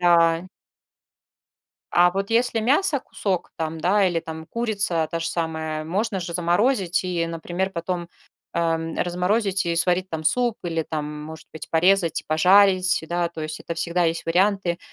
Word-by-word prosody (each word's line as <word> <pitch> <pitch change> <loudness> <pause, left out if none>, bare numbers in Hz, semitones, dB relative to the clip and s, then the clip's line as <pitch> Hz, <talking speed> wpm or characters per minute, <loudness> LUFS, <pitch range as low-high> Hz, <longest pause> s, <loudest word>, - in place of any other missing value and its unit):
Да. 170 0 +4 1.5
А 175 0 +5
вот 195 +3 -3
если 235 -1 +2
мясо 280 - +2
кусок, 185 -7 -3
там, 160 0 -3
да, 195 +3 +3
или 170 -2 0
там 160 0 -8
курица 200 -8 -1
та 165 - -2
же 165 - -2
самая, 160 -2 -3
можно 195 +4 -1
же 170 -1 -5
заморозить 180 +2 +1
и, 175 -2 -1
например, 175 +3 -3
потом, 175 -1 -4 0.4
ам, 165 -1 -1
разморозить 190 +2 0
и 170 0 0
сварить 180 +2 +2
там 160 -1 -4
суп 240 +4 +1
или 165 -2 -1
там, 150 -1 -5
может 160 0 -10
быть, 160 - -8
порезать 175 0 +3
и - - -24
пожарить, 185 +3 +4
да, 175 0 0
то 165 -1 -9
есть 155 0 -5
это 170 - -5
всегда 170 +1 0
есть 165 0 -1
варианты. 185 0 +1
175 Hz, 160 wpm, -23 LUFS, 165-195 Hz, 1.5 s, А